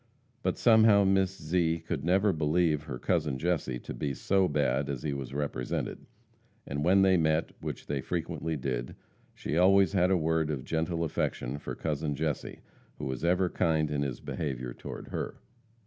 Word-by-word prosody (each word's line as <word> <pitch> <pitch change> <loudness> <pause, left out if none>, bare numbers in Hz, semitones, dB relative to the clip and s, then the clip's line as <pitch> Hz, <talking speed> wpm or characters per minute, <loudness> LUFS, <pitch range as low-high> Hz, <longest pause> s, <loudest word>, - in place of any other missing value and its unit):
But - - -1
somehow 110 -3 +6
Miss 95 0 +2
Zee 80 +1 +1
could 80 -2 -4
never 95 +4 +3
believe 80 0 +2
her 65 - -5
cousin 75 -1 0
Jesse 75 -5 -1
to - - -6
be 70 -2 -3
so 95 +4 +2
bad 70 -3 0
as 70 -3 -4
he 75 -2 -1
was 70 -2 -5
represented, 70 -3 -3 0.6
and 70 +1 -3
when 95 +3 +5
they 95 -1 +5
met 80 0 +1
which - - -5
they 70 -2 -2
frequently 80 0 -3
did 65 -2 -3 0.4
she 75 - -3
always 95 +2 +5
had 90 -2 +3
a 95 - +4
word 80 -1 +1
of 70 -4 -3
gentle 80 +1 -1
affection 70 -3 -2
for - - -6
cousin 75 -1 -2
Jesse, 75 -1 -3 0.4
who - - -5
was 65 +2 -4
ever 90 +2 +3
kind 80 -4 +1
in 70 -1 0
his 70 -3 -3
behavior 65 -5 -4
toward - - -8
her. - - -4
80 Hz, 175 wpm, -29 LUFS, 70-90 Hz, 0.6 s, somehow